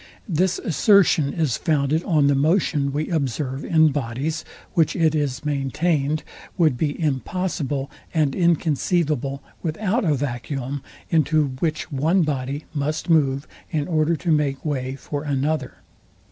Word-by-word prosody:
This 180 0 +1
assertion 170 -5 +3
is 155 -8 0
founded 155 +1 +1
on 155 -6 +3
the 140 - +4
motion 145 -1 +2
we 150 +2 -2
observe 135 -2 -1
in 160 -1 +4
bodies, 140 +4 -2 0.3
which, 165 -4 +2
it 160 -2 +3
is 145 -3 -1
maintained, 145 +1 0 0.3
would 155 -6 +3
be 145 +3 -2
impossible 145 -2 -2 0.2
and 150 -4 +1
inconceivable 155 -4 +1 0.2
without 200 +8 -1
a 155 -5 +2
vacuum, 135 +1 -3 0.3
into 155 -2 +3
which 160 0 -2
one 160 +7 +2
body 140 0 -2
must 155 +4 -1
move 140 -3 +2 0.2
in 150 -3 -1
order 160 0 +2
to 170 +1 -1
make 145 -2 +1
way 135 -3 -2
for 145 +1 -5
another.. 145 -1 -1
150 Hz, 130 wpm, -23 LUFS, 140-160 Hz, 0.3 s, the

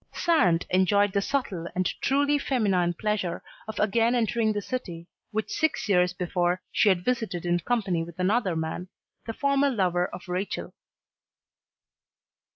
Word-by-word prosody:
Sand 185 - +3
enjoyed 200 +2 +3
the 200 - +2
subtle 195 -9 -2
and 185 0 0 0.2
truly 285 +2 +2
feminine 195 -11 +1
pleasure 205 -4 -2 0.2
of 220 - -5
again 225 +3 +2
entering 225 -1 +1
the 210 - -1
city 175 -10 -5 0.2
which 220 0 -3
six 315 -6 0
years 180 -3 +3
before 180 0 0
she 210 - +4
had 180 -2 +1
visited 225 -9 -1
in 175 0 +2
company 195 -4 0
with 170 0 -11
another 190 0 +1
man, 160 +3 -3 0.4
the 225 - -3
former 280 +2 +2
lover 180 -7 +1
of 185 - -10
Rachel. 180 +3 -3
195 Hz, 145 wpm, -26 LUFS, 180-235 Hz, 0.4 s, she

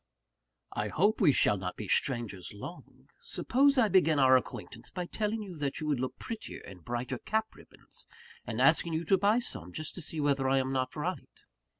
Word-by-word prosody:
"I 105 - -2
hope 205 - +1
we 165 -7 +6
shall 105 - +3
not 90 -1 -4
be 105 - -6
strangers 110 -7 +1
long. 170 +12 -11
Suppose 280 - +2
I 240 -4 +5
begin 170 -5 +4
our 130 -1 +6
acquaintance, 120 -2 -3
by 180 -1 -4
telling 215 +3 -2
you 190 -4 -8
that 140 -2 -3
you 155 - -4
would 145 -4 0
look 130 0 -3
prettier 230 -2 -7
in 95 -2 -11
brighter 120 - -4
cap 220 +1 -1
ribbons, - - -14 0.4
and - - -5
asking 170 -2 +4
you 160 +1 -1
to 195 - +4
buy 205 +4 +4
some, 90 - -5
just 155 - -4
to 180 - -6
see 160 0 -5
whether 140 -2 +1
I 135 - +3
am 130 0 0
not 130 -1 -1
right?" 170 +4 -5
150 Hz, 200 wpm, -30 LUFS, 125-195 Hz, 0.4 s, we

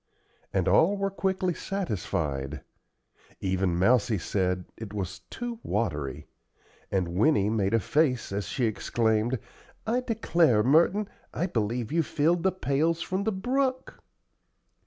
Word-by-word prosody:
And - - 0
all 195 +6 +4
were 195 0 -1
quickly 190 -2 0
satisfied. 80 - -3 0.8
Even 95 -2 0
Mousie 115 +3 +3
said 90 0 -1
it 105 -2 -8
was 95 -2 -4
"too 240 -1 -5
watery," 75 - -2 0.7
and 95 -3 0
Winnie 100 - +3
made 105 -1 +1
a - - +4
face 130 - +1
as 100 +1 -2
she 125 - 0
exclaimed, 110 +2 +1 0.5
"I 235 +3 +1
declare, 170 - +2
Merton, 170 - +4 0.3
I 170 - 0
believe 115 - -2
you 165 +1 +3
filled 165 +3 +1
the 190 - +2
pails 165 -1 0
from 190 +2 -2
the 220 - +2
brook!" 260 +6 -1
125 Hz, 130 wpm, -27 LUFS, -, 0.8 s, all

